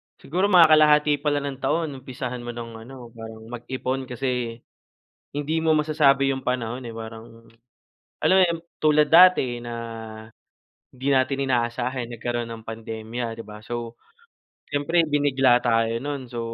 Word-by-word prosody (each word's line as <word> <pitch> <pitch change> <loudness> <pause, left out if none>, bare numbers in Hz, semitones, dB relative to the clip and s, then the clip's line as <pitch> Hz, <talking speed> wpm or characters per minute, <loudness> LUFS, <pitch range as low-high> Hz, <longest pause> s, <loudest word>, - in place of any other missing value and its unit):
siguro 185 +7 -1
mga 180 -4 +7
kalahati 150 -1 +5
pa 150 - -4
lang 145 -1 +1
ng 140 -2 -5
taon 160 +2 0
umpisahan 130 -2 -6
mo 120 0 -7
ng 115 -1 -8
ano, 125 -3 -11
parang 110 -1 -10
mag-ipon 130 +2 -4
kasi 125 -2 -2 0.8
hindi 145 +3 -2
mo 160 0 +2
masasabi 150 -3 +3
yung 135 -1 -3
panahon, 125 0 -2
eh. 115 - -7
Parang, 115 0 -10 0.7
alam 185 - +4
mo - - +6
yun, 170 -1 -2 0.2
tulad 150 -1 +3
dati 165 -8 +6
na 120 0 -7 1.2
hindi 130 +2 -3
natin 135 0 +2
inaasahan 120 +1 -1
nagkaroon 120 +1 -3
ng 115 -1 -8
pandemya, 115 +1 -5
'di 115 - -7
ba. 105 0 -11
So 120 -1 -5 0.7
siyempre, 145 +4 +1
binigla 135 -4 +3
tayo 115 -1 +1
nun. 140 -2 -4
So, 120 - -4
130 Hz, 150 wpm, -24 LUFS, 120-145 Hz, 1.2 s, mga